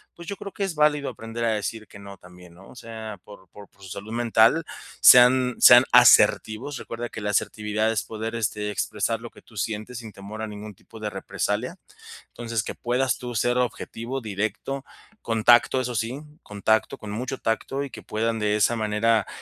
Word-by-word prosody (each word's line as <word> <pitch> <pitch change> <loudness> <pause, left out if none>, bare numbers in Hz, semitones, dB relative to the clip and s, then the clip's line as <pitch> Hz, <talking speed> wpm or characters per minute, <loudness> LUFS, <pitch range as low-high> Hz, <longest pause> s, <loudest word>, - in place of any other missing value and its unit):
pues, 170 -1 -12
yo 200 - -4
creo 200 - -8
que 200 - -4
es 185 -4 -5
válido 150 -2 +2
aprender 115 +1 -5
a 115 - +2
decir 110 +1 -4
que - - -14
no 100 0 -11
también, 90 -1 -16
¿no? 95 +2 -16
O - - -15
sea, 110 -3 -8
por 100 -3 -15
por 100 +3 -14
por 100 - -28
su - - -10
salud 100 +4 -8
mental 120 +6 +3 0.4
sean, 125 0 +7
sean 120 +1 +8
asertivos, 120 +2 +5
recuerda 120 0 -6
que - - -8
la 105 - -2
asertividad 105 +1 0
es 105 - -1
poder, 110 +1 -6
este, 105 -2 -2
expresar 110 +2 -2
lo 120 - -8
que - - -18
tú 115 - -20
sientes 110 +3 -4
sin 110 -2 -10
temor 100 +2 -9
a 110 - -3
ningún 105 0 -9
tipo 110 - -15
de 105 -1 -3
represalia. 105 - -3 0.5
Entonces, 115 -2 -4
que - - -6
puedas 125 +1 0
tú 120 -1 -7
ser 120 +3 +1
objetivo 125 +1 -4
directo, 110 +6 -4 0.4
con 115 -1 -2
tacto, 120 +2 +5
eso 125 -1 -4
sí, 115 +5 -2 0.2
con 105 -1 -10
tacto 110 0 +2
con 105 - -9
mucho 125 +5 -4
tacto, 135 +5 -2
y 140 - -8
que - - -10
puedan 115 +1 -2
de 105 -1 +1
esa 105 +3 +2
manera 110 0 +1
115 Hz, 200 wpm, -24 LUFS, 105-120 Hz, 0.5 s, sean